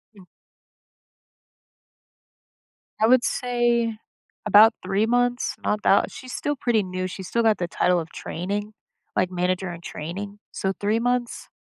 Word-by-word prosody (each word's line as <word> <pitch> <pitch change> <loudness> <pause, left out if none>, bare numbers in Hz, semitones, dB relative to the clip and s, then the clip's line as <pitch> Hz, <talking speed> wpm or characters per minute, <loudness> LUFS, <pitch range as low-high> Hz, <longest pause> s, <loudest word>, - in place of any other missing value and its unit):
Mm. 190 -3 -16 2.7
I 220 - +4
would 250 +1 +5
say 240 -2 0 0.5
about 215 +2 +7
3 195 +3 +1
months. 245 +1 +1
Not 210 0 -1
that 195 - +4
she's 255 -1 -9
still 290 0 -2
pretty 235 -5 +1
new; 185 0 -3
she 190 +1 -7
still 235 +5 0
got 220 -2 +3
the 175 - -1
title 180 +1 +2
of 165 0 -7
training, 205 +5 -4 0.4
like, 185 0 +1
manager 180 +1 -1
in 170 0 -9
training, 200 +7 -6
so 190 0 -2
3 210 +3 +1
months. 245 0 -1
205 Hz, 140 wpm, -24 LUFS, 185-235 Hz, 2.7 s, about